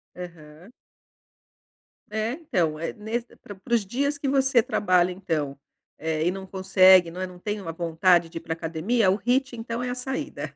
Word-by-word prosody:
Aham. 170 +1 -11 1.4
É, 220 +2 -1
então, 185 - -1
eh, 165 - -3
nesse 230 +3 -5
para 205 - -11
para 235 +6 -6
os 220 -4 +3
dias 280 +7 -1
que 285 - -3
você 270 -3 +3
trabalha 180 -4 +2
então, 160 -7 -3 0.4
eh, 160 0 -1
e 175 - +2
não 190 0 -7
consegue, 185 -2 +5
não 180 - -7
é, 185 - -2
não 180 -1 -12
tem 210 +3 -3
uma 165 - -5
vontade 170 +1 +2
de 165 - -8
ir - - -5
pra 160 - -3
academia, 170 +6 +1
o - - +2
HIIT 255 +3 0
então 230 +1 -4
é 250 - -2
a 245 - -3
saída. 265 +4 -5
190 Hz, 190 wpm, -25 LUFS, 170-235 Hz, 1.4 s, consegue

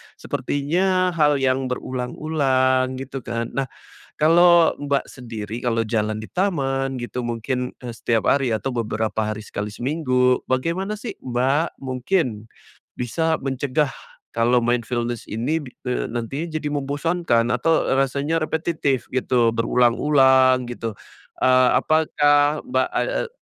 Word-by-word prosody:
sepertinya 180 +6 0
hal 150 -4 +3
yang 130 -1 +1
berulang-ulang, 130 0 0
gitu 135 +1 -6
kan. 115 -1 -4
Nah, 135 -1 -2 0.5
kalau 170 +2 +5
Mbak 140 -1 -1
sendiri 115 -2 -7
kalau 115 -2 0
jalan 110 -1 -1
di 110 - -7
taman 135 -8 0
gitu 120 +1 -4
mungkin, 120 +2 -2
eee, 120 -2 -7
setiap 115 -1 0
hari 135 -3 +2
atau 120 +4 -2
beberapa 110 -1 -1
hari 110 - -4
sekali 105 0 -4
seminggu, 125 0 +1
bagaimana 180 +11 -1
sih 235 - -6
Mbak 130 +6 0
mungkin 130 - -2 0.5
bisa 160 +7 0
mencegah 135 +1 -1 0.4
kalau 120 +2 +3
mindfulness 120 0 -2
ini 135 +9 -1
bi 130 - -10 0.2
eee, 125 -2 -2
nantinya 130 +8 -4
jadi 150 - -7
membosankan? 140 -4 0
Atau, 160 +6 +2
eee, - - +1
rasanya 140 +4 -1
repetitif 155 -5 -1
gitu, 120 -3 +2
berulang-ulang 130 +2 +4
gitu, 115 -2 -4 0.5
eee, 130 -1 +4
apakah 145 -1 +2
Mbak 255 - +1
ad - - -1
eee, - - -1
130 Hz, 130 wpm, -22 LUFS, 120-150 Hz, 0.5 s, kalau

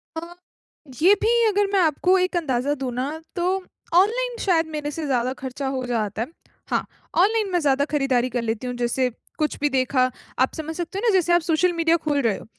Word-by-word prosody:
अ, 320 - -3 0.7
जी, 275 +7 +2
अभी 460 +3 +3
अगर 410 -1 +2
मैं 395 - +4
आपको 360 +3 +3
एक 365 0 0
अंदाज़ा 280 -3 0
दूँ 265 -3 -4
ना, 255 +4 -2 0.2
तो 350 -1 0 0.5
ऑनलाइन 475 +6 +3
शायद 335 -4 +3
मेरे 295 -1 -3
से 315 +1 -4
ज़्यादा 255 -2 0
खर्चा 265 +1 -4
हो 255 -1 -3
जाता 220 -3 -2
है। 235 - -2 0.4
हाँ, - - 0 0.3
ऑनलाइन 415 +2 +3
मैं 355 - +2
ज़्यादा 285 -2 +2
खरीदारी 255 -3 +1
कर 245 0 -2
लेती 230 +2 -3
हूँ, 245 - -3
जैसे 245 +1 0 0.3
कुछ 305 -1 -1
भी 295 - +3
देखा, 255 -1 +2 0.3
आप 260 - +2
समझ 320 0 -5
सकते 350 +3 -4
हो - - -4
ना, - - +5
जैसे 355 -2 +3
आप 345 - +5
सोशल 340 +2 +2
मीडिया 330 0 +3
खोल 290 -2 +1
रहे 225 -6 +1
हो, - - -12
295 Hz, 210 wpm, -23 LUFS, 255-360 Hz, 0.7 s, ना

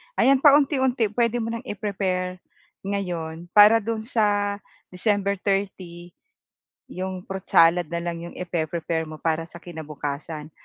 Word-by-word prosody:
ayan, 270 0 +4
paunti-unti 265 -6 +4
puwede 235 +1 +1
mo 230 - -3
ng 230 +2 -5
i-prepare 190 -3 -2 0.4
ngayon, 175 -4 -4
para 210 +1 +7
do'n 220 0 -3
sa 205 -3 +1 0.3
December 200 +1 0
30, 185 -3 -3 0.8
'yong 185 0 -5
fruit 190 -1 -7
salad 165 0 +5
na 170 +1 -4
lang 170 -1 -3
'yong - - -12
ipe-prepare 165 -2 -2
mo 155 - -8
para 165 +1 -1
sa - - -18
kinabukasan. 155 -2 -6
185 Hz, 130 wpm, -24 LUFS, 170-210 Hz, 0.8 s, para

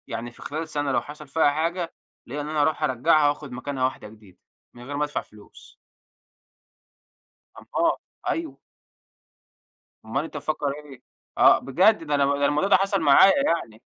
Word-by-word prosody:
يعني، 120 +1 -5
في - - -17
خلال 160 +2 -5
سنة، 145 -2 -2
لو - - +1
حصل 150 0 -11
فيها 145 +1 +2
حاجة 165 +3 -2 0.3
ليّا 145 +4 -5
إن 145 - -6
أنا 155 -1 0
أروح 155 +1 0
أرجعها، 145 +4 +3
وآخُد 145 -1 -5
مكانها 130 +2 -4
واحدة 130 -4 -2
جديدة 105 -3 -17 0.4
من 120 - -13
غير 145 +3 -6
ما 150 - 0
ادفع 145 - -4
فلوس. 105 -1 -17 1.8
أمال - - 0 0.4
أيوه. 155 -5 -3 1.5
أمال 135 +6 -2
أنت 160 - -7
مفكر 150 0 -2 0.2
إيه؟! 135 -4 -13 0.4
آه - - +6
بجد 185 +8 +3
ده 150 -2 -1
أنا 140 -1 +3
ده 140 - +1
الموضوع 150 +7 +1
ده - - +7
حصل 195 0 +1
معايا 155 +6 +7
يعني. 115 - -2
145 Hz, 165 wpm, -24 LUFS, 130-160 Hz, 1.8 s, ده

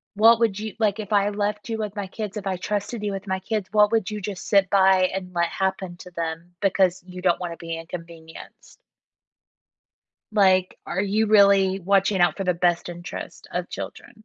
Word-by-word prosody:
what 225 +2 +6
would 220 -4 +1
you 215 -2 -5
like, 215 -1 +1
if 210 0 -6
I 205 0 +3
left 210 +1 -2
you 225 - -2
with 210 -1 -4
my 200 -2 -4
kids, 210 +1 -6
if 200 -1 -5
I 190 - 0
trusted 210 +3 -3
you 205 - -1
with 195 +1 -6
my 190 0 -1
kids, 210 0 -3
what 210 0 +5
would 220 -4 +1
you 210 -1 -4
just 195 -1 -6
sit 195 -2 +4
by, 190 -1 +5
and 180 -1 -5
let 170 0 +2
happen 190 -2 -2
to 180 - -12
them 165 +1 -5
because 190 -2 +2
you 180 0 -9
don't 180 -1 +2
want 175 -1 -3
to - - -12
be 165 -1 -5
inconvenienced? 165 -1 -11 1.5
Like, 185 -3 +3
are 190 +3 -1
you 210 +2 +1
really 200 -2 +5
watching 195 +1 +2
out 175 - +3
for 195 - -2
the 180 -1 +1
best 175 0 +1
interest 175 +1 -8
of - - -3
children? 215 -3 -9
195 Hz, 200 wpm, -24 LUFS, 180-210 Hz, 1.5 s, what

